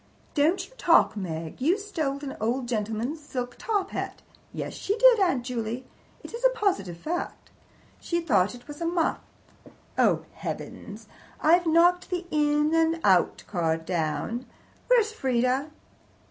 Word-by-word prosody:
"Don't 315 +5 +2
you - - -22
talk, - - +5
Meg! 165 0 -5
You 335 +9 +3
stole 325 -10 -2
an 270 - -5
old 240 +3 0
gentleman's 225 +6 -2
silk 250 -4 -5
top 415 -4 -1
hat. - - -5 0.3
Yes, - - -5
she 410 +3 -2
did, - - +7
Aunt 350 -11 +2
Juley. 240 0 -3 0.4
It - - -10
is 470 +1 -6
a - - +7
positive 390 - -1
fact. 335 - -5 0.5
She 340 - -1
thought 210 - +2
it 245 - -15
was 295 +2 -9
a 335 - 0
muff. 335 -1 +1 0.8
Oh, - - +3
heavens! - - -7 0.3
I've 345 +2 +4
knocked 350 +2 +4
the 360 -1 -2
In 295 0 +2
and 325 0 +2
Out 185 -3 +3
card 165 -4 -1
down. 180 +9 -2 0.4
Where's 465 -4 +4
Frieda? 260 - 0
295 Hz, 145 wpm, -26 LUFS, 235-350 Hz, 0.8 s, did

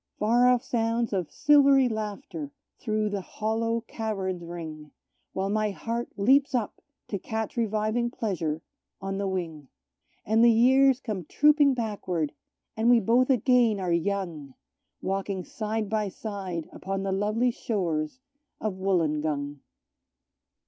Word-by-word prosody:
Far 240 +4 +4
off 250 0 +3
sounds 230 -2 0
of 185 -5 -1
silvery 280 -3 +5
laughter 225 +7 -5 0.3
through 215 -2 -1
the 200 -1 -2
hollow 225 +3 -1
caverns 195 -6 -3
ring, 160 -3 -7 0.4
While 195 +1 -1
my 215 0 +1
heart 230 +4 -4
leaps 265 +6 +4
up 230 -4 -2 0.3
to 200 - -2
catch 220 +2 -4
reviving 220 +1 0
pleasure 170 -10 -3 0.4
on 195 0 -4
the 200 - -1
wing; 165 -6 -4 0.6
And 220 +2 +3
the 235 - +8
years 260 +3 +5
come 205 - -4
trooping 290 - +4
backward, 190 - -2 0.4
and 225 +2 +2
we 240 -1 +7
both 240 +5 +3
again 245 -4 +3
are 180 -2 0
young, 170 -6 -2 0.5
Walking 195 -1 -2
side 215 +1 -3
by 210 -1 -1
side 190 -5 -5
upon 195 +1 -4
the 195 - -1
lovely 215 +5 +1
shores 175 -4 -2 0.4
of 215 -2 -2
Wollongong. 155 -6 0
215 Hz, 130 wpm, -27 LUFS, 185-235 Hz, 0.6 s, the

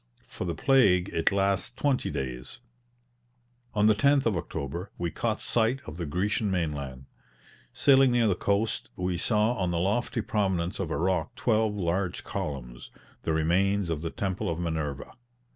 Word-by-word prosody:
For - - -7
the 85 -2 -2
plague 100 -10 +4
it 80 +3 +1
lasts 100 0 +1
twenty 130 +1 0
days. 65 - -5 1.2
On 105 0 +3
the 110 - +6
10th 140 +6 +3
of 110 -4 +2
October 85 +3 -4
we 85 -2 -2
caught 110 -2 -1
sight 120 +2 +1
of 75 +1 -8
the 85 -3 -4
Grecian 100 +6 0
mainland. 70 -7 -3 0.7
Sailing 135 -2 +5
near 120 -1 +3
the 100 - +3
coast, 100 +4 -1
we 90 0 -1
saw 105 +5 +2
on 95 -7 -1
the 85 - -1
lofty 105 +7 0
prominence 95 -4 -1
of 95 -5 -2
a - - -1
rock 90 -2 0
twelve 110 -2 +1
large 90 -1 -1
columns, - - -5 0.3
the - - -2
remains 90 +4 +1
of 75 -2 -2
the 80 - -3
Temple 95 +1 -2
of 85 - -2
Minerva. 80 -5 -3
95 Hz, 160 wpm, -28 LUFS, 80-110 Hz, 1.2 s, the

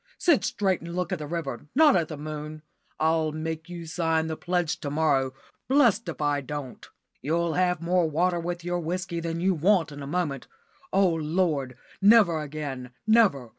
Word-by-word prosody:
Sit 335 -7 +3
straight 190 -3 0
and 170 +1 -7
look 180 +1 -2
at 180 - -2
the 150 - -5
river, 145 -4 -4
not 300 0 +6
at 170 -3 +1
the 155 - -7
moon. 155 +1 -7 0.4
I'll 160 0 +2
make 160 +1 -5
you 170 -1 -7
sign 160 -1 0
the 160 0 -3
pledge 175 -1 -1
to 145 - -4
morrow, 140 -3 +1 0.4
blessed 240 -5 +3
if - - -6
I 145 -1 +1
don't! 140 -1 -7 0.3
You'll 165 +5 0
have 180 -1 +1
more 175 -1 +2
water 175 +3 +1
with 175 0 -4
your 175 0 -1
whisky 175 +1 -3
than 165 0 -3
you 190 +2 +2
want 170 -1 +2
in 145 0 -8
a 140 - -6
moment. 150 -5 -2 0.4
Oh, 195 -1 +4
Lord! 155 -5 -1 0.2
never 200 -6 +5
again 140 -4 -5 0.2
never. 210 - +3
165 Hz, 180 wpm, -26 LUFS, 150-180 Hz, 0.4 s, not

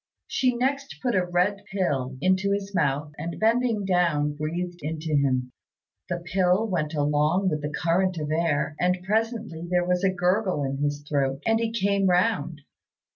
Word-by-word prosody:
She 255 -2 +1
next 275 +3 -1
put 245 -2 -1
a 185 - +3
red 180 +3 0
pill 135 -9 -1
into 190 +3 +2
his 200 0 -3
mouth, 150 -3 0
and 165 +2 -5
bending 225 -2 +2
down 170 -6 +2
breathed 175 +4 -4
into 155 +1 -2
him. 130 -3 +1 0.6
The 175 - -1
pill 180 +4 +1
went 165 -5 -2
along 150 +6 +2
with 150 -3 -2
the 150 - -3
current 175 +4 +1
of 150 -1 -3
air, 155 -2 0
and 180 0 +1
presently 220 -4 -1
there 180 -1 +2
was 180 +1 0
a 195 - +4
gurgle 185 -2 +1
in 135 0 -2
his 145 0 -2
throat, 140 -1 -1
and 225 0 +3
he 230 -1 -1
came 200 -3 +1
round. 180 -4 +1
180 Hz, 170 wpm, -25 LUFS, 150-200 Hz, 0.6 s, a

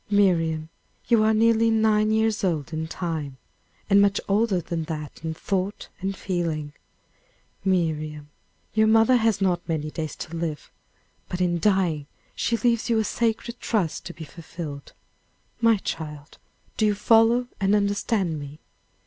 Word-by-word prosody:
"Miriam, 165 -6 +2 0.4
you 230 -3 +5
are 215 0 +4
nearly 225 +1 +4
nine 220 -1 +3
years 220 0 +1
old 165 -4 -1
in 160 0 -2
time, 160 -5 -4 0.5
and 200 -1 +5
much 200 0 +3
older 205 -1 +2
than 165 -1 -4
that 155 -1 -6
in 160 -1 -3
thought 195 +3 -3
and 195 0 -3
feeling. 165 -5 -2 0.9
Miriam, 155 -5 -1 0.4
your 220 0 +4
mother 225 +3 +5
has 225 -3 +1
not 180 -3 +2
many 155 -2 -2
days 155 -1 -4
to 165 - -7
live; 165 -3 -4 0.6
but 180 - -3
in 175 -1 +1
dying, 175 -7 +1 0.3
she 230 - 0
leaves 235 -1 +1
you 230 - +3
a 220 - +2
sacred 235 +2 -1
trust 195 -9 -1
to - - -6
be 165 - -8
fulfilled. 155 -3 -8 0.7
My 230 -2 +4
child, 150 -5 -6 0.4
do 215 - +3
you 210 - +2
follow 225 +3 +4
and 195 +1 +3
understand 200 -4 0
me?" 145 +1 -8
190 Hz, 150 wpm, -25 LUFS, 160-220 Hz, 0.9 s, you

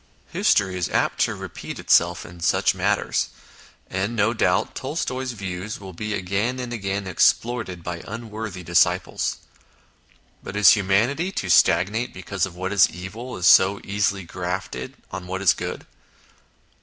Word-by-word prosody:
History 95 -2 +2
is 85 - -1
apt - - 0
to - - +2
repeat - - -7
itself 85 0 +3
in 85 0 -12
such 85 - +2
matters, - - 0 0.6
and, 100 +5 -2
no 110 +1 +2
doubt, 90 -5 +1
Tolstoy's 130 -3 -3
views 95 -1 -5
will 95 -2 -9
be 105 +4 -3
again 105 +7 -1
and 125 -1 -4
again 100 -2 -3
exploited 95 0 +1
by 85 0 -5
unworthy 110 -4 -6
disciples. 85 0 +1 1.0
But 95 - -8
is 105 -1 +7
humanity 115 - +2
to 90 - -2
stagnate 105 +8 +3
because 95 0 -2
what 95 +3 -4
is 95 -5 +6
evil 110 +9 -7
is 90 - -2
so 95 +2 +6
easily 100 -1 0
grafted 90 -7 -5 0.2
on 90 - -6
what 95 +1 -3
is 100 - +5
good - - -6
100 Hz, 145 wpm, -23 LUFS, 90-110 Hz, 1.0 s, is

